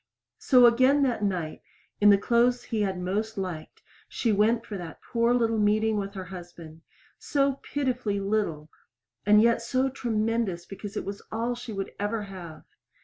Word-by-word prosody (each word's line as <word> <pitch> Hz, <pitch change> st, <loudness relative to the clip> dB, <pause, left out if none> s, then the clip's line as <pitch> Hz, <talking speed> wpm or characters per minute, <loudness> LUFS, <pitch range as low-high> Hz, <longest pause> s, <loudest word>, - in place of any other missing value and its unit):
So 250 Hz, -3 st, +6 dB
again 260 Hz, +4 st, +5 dB
that 245 Hz, -5 st, 0 dB
night, 180 Hz, -6 st, -2 dB, 0.4 s
in 210 Hz, -, +6 dB
the 200 Hz, -, +7 dB
clothes 240 Hz, +3 st, +2 dB
he 220 Hz, -2 st, -2 dB
had 190 Hz, -3 st, -1 dB
most 205 Hz, +5 st, -2 dB
liked, 180 Hz, -5 st, -6 dB, 0.3 s
she 230 Hz, -, 0 dB
went 225 Hz, +3 st, +2 dB
for 215 Hz, -, -6 dB
that 175 Hz, -5 st, -8 dB
poor 235 Hz, 0 st, +1 dB
little 230 Hz, -2 st, +2 dB
meeting 215 Hz, +1 st, +2 dB
with 200 Hz, -1 st, -3 dB
her 190 Hz, -, -5 dB
husband 170 Hz, -3 st, -11 dB, 0.4 s
so 275 Hz, -2 st, 0 dB
pitifully 250 Hz, -7 st, -2 dB
little, 195 Hz, -7 st, -2 dB, 0.6 s
and 210 Hz, +1 st, +6 dB
yet 235 Hz, 0 st, +3 dB
so 260 Hz, +3 st, 0 dB
tremendous 225 Hz, -7 st, -1 dB
because 200 Hz, +1 st, -8 dB
it -, -, -3 dB
was 200 Hz, +1 st, -6 dB
all 230 Hz, +2 st, -1 dB
she 245 Hz, -1 st, -8 dB
would 195 Hz, -2 st, -4 dB
ever 210 Hz, +1 st, -2 dB
have. 175 Hz, -6 st, -10 dB
215 Hz, 165 wpm, -27 LUFS, 195-235 Hz, 0.6 s, the